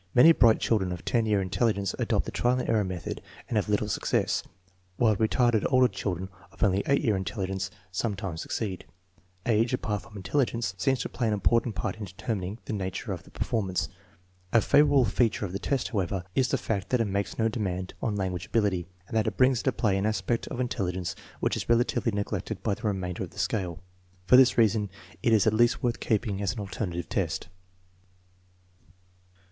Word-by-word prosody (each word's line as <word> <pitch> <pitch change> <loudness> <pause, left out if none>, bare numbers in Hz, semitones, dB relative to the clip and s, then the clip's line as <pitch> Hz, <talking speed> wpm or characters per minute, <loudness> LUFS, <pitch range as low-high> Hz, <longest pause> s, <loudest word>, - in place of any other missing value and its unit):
Many 140 +7 +9
bright 115 -8 +5
children 95 -5 +1
of 90 -1 -6
10 115 -2 +1
year 105 -2 +2
intelligence 100 0 0
adopt - - +1
the - - -5
trial 125 +1 +1
and - - -3
error 110 -2 +3
method 90 -3 -5 0.3
and - - -3
have 105 0 +1
little 105 0 +1
success, 105 - 0 0.6
while 110 -1 +4
retarded 110 +1 +2
older 130 -1 +5
children 95 -3 -4 0.2
of - - -4
only 100 -1 +3
8 140 +1 +3
year 110 -6 +2
intelligence 95 -1 -3 0.2
sometimes 95 -4 -3
succeed. 100 -5 -3 0.6
Age, 115 +2 +2
apart 105 -5 -2
from 100 +4 -13
intelligence, 115 0 0
seems 130 +7 +1
to - - -3
play 120 - -1
an 110 - +1
important 115 +2 +2
part 85 - -3
in 105 - -5
determining 95 +1 -4
the - - -4
nature 95 -3 -3
of - - -6
the - - -18
performance. 95 -5 -1 0.6
A 115 - +6
favorable 145 +1 +5
feature 110 0 +1
of 90 - -6
the 100 - -2
test, 135 0 -1
however, 95 -4 -1
is 130 -1 +2
the - - +1
fact 100 -3 -3
that 125 - +2
it 115 - +2
makes 100 0 -2
no 115 - +2
demand 95 -5 -3
on 105 - -1
lan 95 -2 -1
guage 90 0 -5
ability 105 -5 +1 0.2
and - - -6
that 110 - +2
it - - -2
brings 130 -1 +4
into - - +1
play 100 -4 +1
an 100 - +1
aspect 115 +2 -1
of 125 - -5
in 125 - +1
telligence 90 -6 -2 0.3
which - - +1
is - - -5
relatively 120 0 +2
neglected 100 0 -3
by - - +1
the 100 - -7
remainder 95 -3 -2
of - - -3
the - - -19
scale. 90 -3 -2 0.4
For 125 - +6
this 130 -1 +6
reason 110 -2 +3 0.3
it 115 - +2
is 110 -3 +5
at 110 - +3
least 120 +2 +3
worth 120 -1 0
keeping 105 -3 0
as 100 -1 0
an - - -7
alternative 90 -4 -4
test. 90 -2 -2
105 Hz, 200 wpm, -28 LUFS, 95-115 Hz, 0.6 s, Many